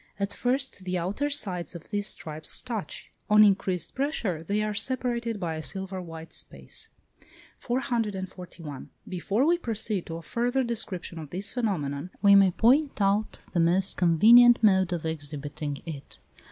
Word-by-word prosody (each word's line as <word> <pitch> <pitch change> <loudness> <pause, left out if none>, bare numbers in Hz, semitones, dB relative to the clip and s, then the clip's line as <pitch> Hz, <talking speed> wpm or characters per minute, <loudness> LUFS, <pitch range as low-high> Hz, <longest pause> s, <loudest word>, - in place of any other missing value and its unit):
At 200 0 -1
first, 260 -4 -1
the 185 0 -2
outer 200 +12 -1
sides 190 -12 -2
of 170 - -11
these 205 -1 0
stripes 155 -4 -2
touch; 230 -5 -5 0.2
on 210 0 +8
increased 190 -4 +1
pressure 250 - -1
they 205 +5 0
are 215 0 -1
separated 235 -1 -2
by 170 -4 -2
a 155 - -4
silver 190 +6 -4
white 165 -1 -9
space. - - -8 0.7
441. 190 - -4 0.2
Before 195 +7 0
we 345 +2 +3
proceed 215 - -3
to 165 - -5
a 165 - -7
further 245 - 0
description 205 -8 -4
of 155 -3 -8
this 195 +5 -4
phenomenon, 175 - -2
we 200 -1 +6
may 195 -1 +7
point 265 - +3
out 200 +2 +1
the 175 - +1
most 175 +3 +2
convenient 230 +8 +7
mode 190 -3 +4
of 170 -2 -3
exhibiting 145 -2 -4
it. 150 -4 -8
195 Hz, 155 wpm, -27 LUFS, 170-230 Hz, 0.7 s, on